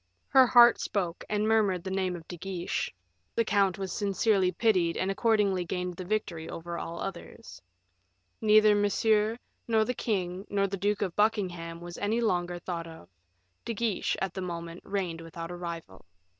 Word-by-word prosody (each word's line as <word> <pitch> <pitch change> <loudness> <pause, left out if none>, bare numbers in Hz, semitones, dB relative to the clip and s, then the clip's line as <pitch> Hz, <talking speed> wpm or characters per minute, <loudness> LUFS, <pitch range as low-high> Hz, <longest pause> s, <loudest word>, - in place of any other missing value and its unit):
Her 260 -1 +7
heart 240 -1 +7
spoke, 180 -4 -2
and 210 0 +1
murmured 205 -5 +2
the 190 - -4
name 190 -1 0
of 165 -2 -10
De 175 - -6
Guiche; 180 0 -3 0.4
the 230 - +2
count 200 -3 +2
was 195 -1 -4
sincerely 200 -2 +2
pitied 180 -4 +2
and 190 +1 0
accordingly 205 -3 +2
gained 180 +1 -3
the 185 - -6
victory 180 -5 -3
over 170 +1 -5
all 170 +1 -6
others. 195 +4 -8 0.8
Neither 215 0 +6
Monsieur, 210 +2 +2 0.3
nor 220 -2 +3
the 250 - -1
king, 190 -4 -2
nor 200 -1 +1
the 195 0 -2
Duke 205 +2 0
of 185 -4 -3
Buckingham, 180 -6 0
was 175 0 -8
any 215 +3 0
longer 175 -6 0
thought 170 -1 -5
of; 160 - -12 0.5
De 230 - -4
Guiche 220 -2 0
at 190 -2 -2
that 190 - -4
moment 170 -1 -6
reigned 180 -5 -3
without 165 +1 -7
a - - -5
rival. 170 - -7
190 Hz, 170 wpm, -29 LUFS, 175-210 Hz, 0.8 s, Her